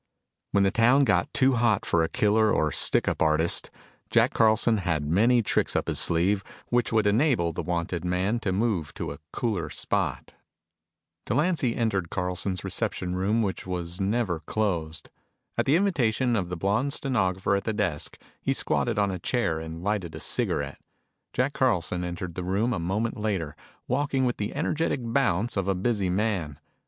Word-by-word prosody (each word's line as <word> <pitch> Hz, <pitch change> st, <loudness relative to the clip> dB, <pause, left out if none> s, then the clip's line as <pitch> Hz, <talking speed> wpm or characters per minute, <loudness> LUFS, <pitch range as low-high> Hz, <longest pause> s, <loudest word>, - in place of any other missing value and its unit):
When 100 Hz, -, +3 dB
the 95 Hz, -, +3 dB
town 125 Hz, +5 st, +4 dB
got 100 Hz, -8 st, +2 dB
too 135 Hz, -1 st, +3 dB
hot 115 Hz, -4 st, +2 dB
for 85 Hz, -, +2 dB
a 80 Hz, -, -1 dB
killer 110 Hz, 0 st, +2 dB
or 75 Hz, -1 st, +1 dB
stick -, -, +3 dB
up -, -, -1 dB
artist, 80 Hz, +1 st, +2 dB, 0.4 s
Jack -, -, +3 dB
Carlson 110 Hz, 0 st, +4 dB
had 80 Hz, -6 st, -1 dB
many 115 Hz, +10 st, +3 dB
tricks -, -, 0 dB
up -, -, 0 dB
his -, -, 0 dB
sleeve 95 Hz, +4 st, +3 dB, 0.3 s
which 120 Hz, 0 st, +1 dB
would 110 Hz, -2 st, +2 dB
enable 105 Hz, -, +2 dB
the -, -, -3 dB
wanted 85 Hz, -1 st, -2 dB
man 90 Hz, +6 st, 0 dB
to 105 Hz, -4 st, -2 dB
move 95 Hz, -6 st, -1 dB
to -, -, -4 dB
a 70 Hz, -, -9 dB
cooler 100 Hz, -10 st, -2 dB
spot. -, -, -2 dB, 0.9 s
Delancy 150 Hz, -6 st, +1 dB
entered 100 Hz, -7 st, -1 dB
Carlson's 90 Hz, 0 st, -2 dB
reception 90 Hz, 0 st, -2 dB
room 105 Hz, +5 st, +1 dB
which 95 Hz, -2 st, -3 dB
was 90 Hz, 0 st, -4 dB
never 100 Hz, -4 st, 0 dB
closed. 80 Hz, -2 st, -3 dB, 0.4 s
At -, -, 0 dB
the 140 Hz, -, +4 dB
invitation 130 Hz, -, +1 dB
of 95 Hz, -5 st, -1 dB
the 90 Hz, -, -4 dB
blonde 105 Hz, +10 st, 0 dB
stenographer 100 Hz, -9 st, 0 dB
at 100 Hz, -, -2 dB
the 110 Hz, -, 0 dB
desk, 95 Hz, -8 st, -2 dB, 0.2 s
he -, -, 0 dB
squatted -, -, 0 dB
on 100 Hz, -1 st, +2 dB
a 90 Hz, -, -4 dB
chair 85 Hz, -6 st, 0 dB
and 80 Hz, +1 st, -7 dB
lighted 95 Hz, -5 st, -2 dB
a -, -, -6 dB
cigarette. -, -, -2 dB, 0.5 s
Jack 130 Hz, +3 st, 0 dB
Carlson 90 Hz, -8 st, 0 dB
entered 85 Hz, 0 st, -5 dB
the 90 Hz, -, -5 dB
room 100 Hz, +7 st, 0 dB
a 100 Hz, -, -2 dB
moment 105 Hz, +8 st, -2 dB
later, 95 Hz, -8 st, -2 dB, 0.3 s
walking 135 Hz, 0 st, 0 dB
with 120 Hz, -, -1 dB
the 105 Hz, 0 st, -4 dB
energetic 155 Hz, -4 st, -1 dB
bounce 115 Hz, -3 st, 0 dB
of 100 Hz, -2 st, -1 dB
a 95 Hz, -, +1 dB
busy 100 Hz, 0 st, 0 dB
man. 90 Hz, -7 st, -1 dB
100 Hz, 175 wpm, -26 LUFS, 90-115 Hz, 0.9 s, town